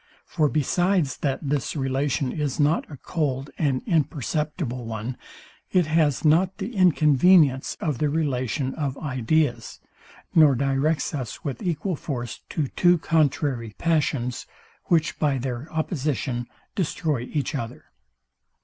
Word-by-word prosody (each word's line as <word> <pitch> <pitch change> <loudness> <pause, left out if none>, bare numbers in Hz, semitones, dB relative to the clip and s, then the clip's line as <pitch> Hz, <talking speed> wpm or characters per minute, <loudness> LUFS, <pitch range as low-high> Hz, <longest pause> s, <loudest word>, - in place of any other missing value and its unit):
For 155 -3 +1
besides, 170 +1 +1
that 140 0 -2
this 140 0 -1
relation 135 -1 0
is 150 0 -2
not 150 +3 +2
a 145 - -9
cold 140 -2 -2
and 135 -5 +1
imperceptible 150 - -1
one, 115 +2 -4 0.6
it 180 -3 +3
has 155 -2 +1
not 175 +5 +3
the 215 +4 -5
inconvenience 155 - +4
of 150 -6 -2
the 150 - +2
relation 135 -3 -1
of 140 -3 -3
ideas, 130 -2 -1 0.5
nor 155 -4 +6
directs 140 +4 0
us 130 -6 -5
with 135 -5 -4
equal 175 +1 -1
force 120 -6 -5
to 150 -5 -2
two 175 -1 +4
contrary 140 -8 0
passions, 145 -7 0 0.4
which 160 -3 +1
by 145 -3 +2
their 130 +3 -4
opposition 140 - -2 0.3
destroy 150 - -1
each 150 0 -1
other. 120 -4 -6
145 Hz, 125 wpm, -24 LUFS, 130-160 Hz, 0.6 s, nor